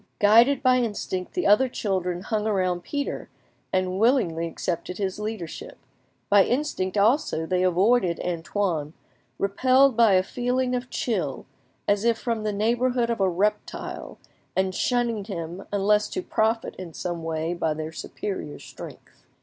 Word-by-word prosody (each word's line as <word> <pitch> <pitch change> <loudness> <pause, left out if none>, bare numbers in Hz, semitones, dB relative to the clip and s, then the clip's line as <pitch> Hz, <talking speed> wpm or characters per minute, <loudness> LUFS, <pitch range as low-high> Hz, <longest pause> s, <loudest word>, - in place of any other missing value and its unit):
Guided 235 +7 +5
by 255 -1 +5
instinct, 205 -6 -2
the 365 - 0
other 250 +6 +5
children 185 -6 -2
hung 215 +1 -1
about 185 -4 0
Pierre 285 -1 -4 0.4
and 185 0 0
willingly 195 -9 +2
accepted 175 +2 -4
his 195 -1 -2
leadership; 210 -6 -6 0.5
by 200 -1 +6
instinct 225 -8 -1
also 205 - +2
they 180 +2 0
avoided 185 +1 +3
Antoine, 170 -3 -2 0.4
repelled 255 +6 +3
by 230 -3 +5
a 185 0 +4
feeling 250 +4 -1
of 250 0 -2
chill, 180 - -2 0.4
as 205 0 +2
if 235 -1 +3
from 230 -2 -2
the 215 0 -1
neighbourhood 235 +3 +1
of 230 - -2
a 190 - +4
reptile, 195 +4 -2 0.4
and 190 0 +1
shunning 235 -1 0
him 175 -2 -6
unless 210 +1 +2
to 370 - -4
profit 225 -5 0
in 175 -4 -8
some 175 -2 -4
way 160 +1 -2
by 165 -2 -1
their 155 +1 -5
superior 160 -1 -5
strength. - - -12
205 Hz, 145 wpm, -25 LUFS, 180-235 Hz, 0.5 s, by